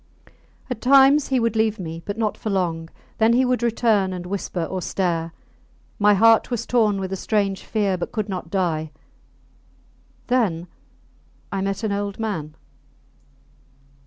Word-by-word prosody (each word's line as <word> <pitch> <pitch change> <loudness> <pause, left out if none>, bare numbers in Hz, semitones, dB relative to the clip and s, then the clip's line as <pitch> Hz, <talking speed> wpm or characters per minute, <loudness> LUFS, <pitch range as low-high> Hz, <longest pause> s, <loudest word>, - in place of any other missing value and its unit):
At 250 -4 -5
times 275 +2 +5
he 265 -2 +1
would 230 -1 0
leave 220 0 +1
me, 165 -3 -6
but 205 - -3
not 220 -2 0
for 220 - -5
long; 170 -4 -1 0.3
then 225 +1 +4
he 255 +2 +3
would 250 0 0
return 220 -5 +1
and 180 -1 -6
whisper 185 -2 -3
or 185 +3 -4
stare. 170 -3 -1 0.7
My 205 0 +5
heart 225 +2 +5
was 235 -2 -2
torn 215 -5 +2
with 190 0 -4
a - - 0
strange 200 -1 -1
fear, 200 -4 -1
but - - -4
could 215 -2 -2
not 185 -4 -5
die. 165 -4 -1 1.4
Then 210 -10 +1 0.9
I 195 - -2
met 195 +2 -2
an 215 - 0
old 200 0 -3
man. 165 -9 -4
200 Hz, 155 wpm, -22 LUFS, 185-225 Hz, 1.4 s, times